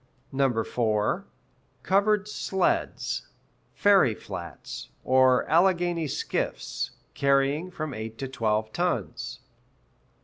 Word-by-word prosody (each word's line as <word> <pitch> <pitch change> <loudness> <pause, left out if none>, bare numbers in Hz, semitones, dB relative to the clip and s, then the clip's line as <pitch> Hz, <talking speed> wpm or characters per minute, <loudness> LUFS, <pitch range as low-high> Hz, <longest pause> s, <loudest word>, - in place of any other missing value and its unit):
(4) 110 -3 0 0.6
Covered 205 +1 +3
"sleds," 190 -3 -1 0.5
ferry 195 - +5
flats, 90 -5 -8
or 130 -1 +4
Alleghany 175 -1 +3
skiffs, - - -2 0.2
carrying 140 +4 +2
from 155 -5 -5
eight 110 0 -6
to 135 - -4
twelve 110 -4 -1
tons. - - -2
140 Hz, 80 wpm, -27 LUFS, 115-180 Hz, 0.6 s, ferry